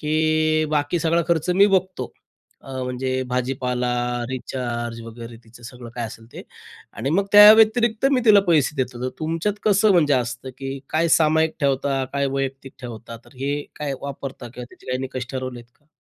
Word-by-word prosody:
की 155 0 +1
बाकी 150 +3 0
सगळा 165 +1 +1
खर्च 170 +1 +1
मी 195 +3 +5
बघतो, 190 -2 -1 0.5
अ, 135 - -13
म्हणजे 130 +1 -2
भाजी-पाला, 125 -1 -1 0.4
रिचार्ज 120 -2 -4
वगैरे 115 0 -10
तिचं 120 +1 -17
सगळं 120 0 -10
काय 120 -1 -3
असेल 115 +1 -12
ते - - -9 0.5
आणि 130 +7 -3
मग 195 +4 +1
त्याव्यतिरिक्त 220 +3 +7
मी 255 - +3
तिला 205 -2 +7
पैसे 150 -2 +2
देत 130 -1 -2
होतो. 125 +1 -4
तुमच्यात 165 +6 -1
कसं 205 0 +4
म्हणजे 150 -5 +3
असतं 125 +1 -3
की 135 0 -5
काय 165 +2 +1
सामायिक 160 0 +3
ठेवता, 135 -1 0
काय 140 0 0
वैयक्तिक 135 0 -4
ठेवता? 115 -1 -8
तर 135 - -20
हे 145 +1 -1
काय 145 -2 -3
वापरता 135 -3 -7
किंवा 125 - -7
त्याचे - - -19
काही 130 0 -2
निकष 130 -2 -5
ठरवलेत 130 -2 -5
का? 145 - -37
135 Hz, 170 wpm, -22 LUFS, 125-160 Hz, 0.5 s, त्याव्यतिरिक्त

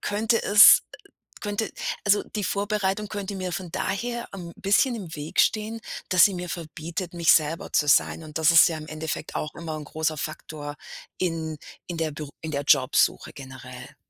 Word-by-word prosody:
könnte 220 +2 0
es, 205 +1 +9
äh - - -10 0.5
könnte 205 +1 -2 0.3
also, 205 0 +3
die 210 - -1
Vorbereitung 205 +1 -1
könnte 200 -1 -5
mir 185 -1 -4
von 175 +1 -5
daher 235 +5 -3
'n 175 -3 -8
bisschen 205 +6 +2
im 180 -7 -8
Weg 150 +1 -7
stehen, 220 +1 0 0.3
dass 180 -2 +7
sie 205 - +3
mir 180 0 -5
verbietet, 170 +2 -6
mich 170 -1 +4
selber 155 +1 -1
zu 150 - +2
sein. 160 +2 +3
Und 155 0 -6
das 160 0 +4
ist 165 - +8
ja 165 - -4
im 155 - -9
Endeffekt 155 0 -5
auch 150 - -4
immer 160 -2 -6
'n 150 - -7
großer 155 +1 -2
Faktor 150 -1 -6 0.4
in 160 -3 -3 0.3
in 175 -2 -5
der 160 -1 -1
Bür 145 -1 -7
in 160 - -5
der 140 0 -1
Jobsuche 135 -2 +2
generell. 130 0 -11
165 Hz, 185 wpm, -25 LUFS, 155-200 Hz, 0.5 s, es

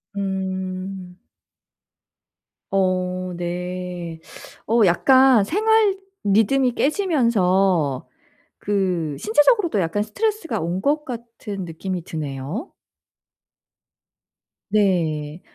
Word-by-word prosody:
음. 190 -1 -4 1.5
어 185 -1 0
네. 175 -1 -5 0.5
어 230 +2 +3
약간 260 +6 +5
생활 425 - +2 0.3
리듬이 225 +6 +3
깨지면서 195 - +1 0.5
그 185 -7 -1
신체적으로도 295 - +3
약간 170 +5 -1
스트레스가 420 - -2
온 170 +3 -2
것 300 +5 +1
같은 230 - -7
느낌이 175 +2 -5
드네요. 155 - -5 2.0
네. 170 -6 0
190 Hz, 155 characters per minute, -22 LUFS, 180-240 Hz, 2.0 s, 약간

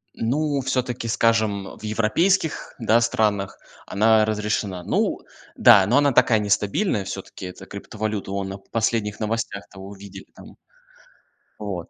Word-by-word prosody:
Ну, 140 +4 0
всё-таки, 125 -2 -2
скажем, 110 -4 0
в - - -17
европейских, 145 - 0
да, 115 0 +3
странах, 105 -4 0 0.3
она 110 +1 +3
разрешена. 105 -3 -2
Ну - - 0 0.4
да, 95 - +7
но 120 +7 +3
она 145 0 +4
такая, 115 -2 +4
нестабильная 105 - 0
всё-таки, 95 - -7
эта 90 - -10
криптовалюта, 105 0 -5
вон 100 0 -2
на 95 - -6
последних 110 0 -2
новостях-то 110 -3 -4
увидели 100 0 -10
там. - - -14 1.0
Вот. 95 -5 -5
110 Hz, 125 wpm, -23 LUFS, 100-115 Hz, 1.0 s, да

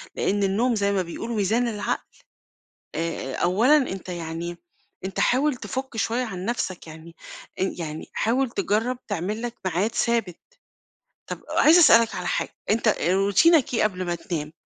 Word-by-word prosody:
لإن 200 0 0
النوم 230 +6 +1
زي 200 -1 +1
ما 195 -2 +1
بيقولوا 225 +7 -5
ميزان 220 +4 +1
للعقل، 210 -2 -4 0.8
آآ، 165 -5 -3
آآ - - -3
أولًا 225 +12 +4
أنت 195 -9 -3
يعني 170 0 -5 0.5
أنت 190 - -4
حاول 275 +2 +2
تفُك 260 -1 -5
شوية 235 +3 0
عن 185 -5 -6
نفْسك، 190 -7 -3
يعني 160 +1 -12 0.5
أن 190 - -1
يعني 155 -2 -6
حاول 250 +3 +1
تجرّب 230 +4 0
تعمل 205 +6 -3
لك 240 0 -4
ميعاد 185 +6 0
ثابت. 230 -7 0 0.9
طب - - -6
عايزة 330 +3 +6
أسألك 230 -8 +6
على - - -4
حاجة، - - -2
أنت 225 +1 +2
روتينك 200 - +3
إيه 230 - +2
قبل 185 -3 -1
ما 175 0 -1
تنام؟ 155 -3 -5
205 Hz, 155 wpm, -24 LUFS, 175-240 Hz, 0.9 s, عايزة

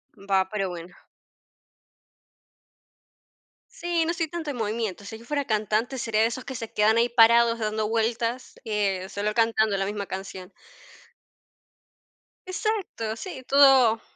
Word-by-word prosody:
Va, 195 -2 0
pero 195 -3 -2
bueno. 175 +1 -9 2.8
Sí, 340 -1 -1
no 335 - 0
estoy 335 -2 -2
tanto 320 -2 -5
en 250 - -7
movimiento. 215 -3 -3
Si 220 +2 -8
yo 230 - -15
fuera 285 0 -2
cantante, 215 +4 -1
sería 220 -2 0
de 225 - +4
esos 250 +2 -6
que 270 - -6
se 230 -2 -6
quedan 215 +2 +3
ahí 235 +1 +3
parados 235 0 +5
dando 215 -1 -2
vueltas, 230 +2 -1
eh, 195 -3 -1
solo 210 +1 -2
cantando 220 -2 +2
la 195 - -1
misma 205 -1 -4
canción. 190 0 -8 1.9
Exacto, 370 - -3
sí, 260 -1 -8
todo 265 -5 +5
225 Hz, 135 wpm, -25 LUFS, 210-255 Hz, 2.8 s, parados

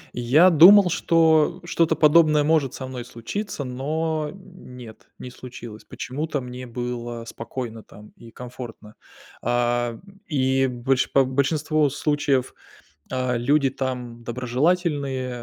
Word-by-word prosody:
Я 140 +10 +4
думал, 180 +4 +8
что 160 -3 +2
что-то 165 -1 +1
подобное 155 -1 +4
может 150 -4 +1
со 130 - -6
мной 130 -2 -7
случиться, 140 - -6
но, 155 +4 -2
м, 185 -9 -14
нет, 115 -3 -12
не 125 - -9
случилось. 120 -3 -11
Почему-то 150 +3 -4
мне 125 0 -8
было 120 -1 -5
спокойно 115 0 -7
там 105 0 -15
и 115 - -14
комфортно. 120 -3 -10 0.5
А, 120 0 0
м, 195 - -17
и 135 -2 +1
больше 130 +1 0
по 135 -1 +4
большинство 150 +3 0
случаев, 145 -2 -1 0.6
а 130 -1 -1
люди 135 +3 +2
там 125 -3 -5
доброжелательные, 135 +2 -1
130 Hz, 125 wpm, -23 LUFS, 120-155 Hz, 0.6 s, думал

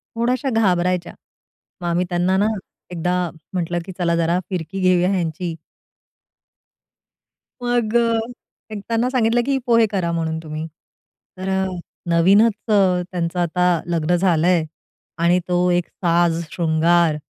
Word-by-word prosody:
थोड्याशा 250 +4 0
घाबरायच्या. 180 -5 +1 0.7
मग 175 - -3
आम्ही 175 +2 +1
त्यांना 180 +2 +1
ना 205 +2 +2 0.4
एकदा 180 +1 -1 0.4
म्हंटलं, 175 -1 -1
की 190 - -7
"चला 170 -2 +1
जरा 170 +2 +1
फिरकी 180 +1 -4
घेऊया 185 0 +3
ह्यांची." 170 -1 -2 2.1
मग, 240 -2 0 0.8
एक 210 - -4
त्यांना 230 +2 +1
सांगितलं, 240 -2 +2
की 275 -1 +1
"पोहे 230 -2 +4
करा 185 -5 -1
म्हणून 160 -1 -2
तुम्ही." 155 +1 -5 0.7
तर 190 +1 -5 0.6
नवीनच 195 +7 +5 0.2
त्यांचं 180 -3 +1
आता 180 +1 +1 0.2
लग्न 170 0 +1
झालंय 175 -1 +2 0.5
आणि 170 +2 +3
तो 180 0 +2
एक 175 -1 +1
साज 170 -1 +1
शृंगार 165 -1 +2
180 Hz, 120 wpm, -21 LUFS, 170-195 Hz, 2.1 s, नवीनच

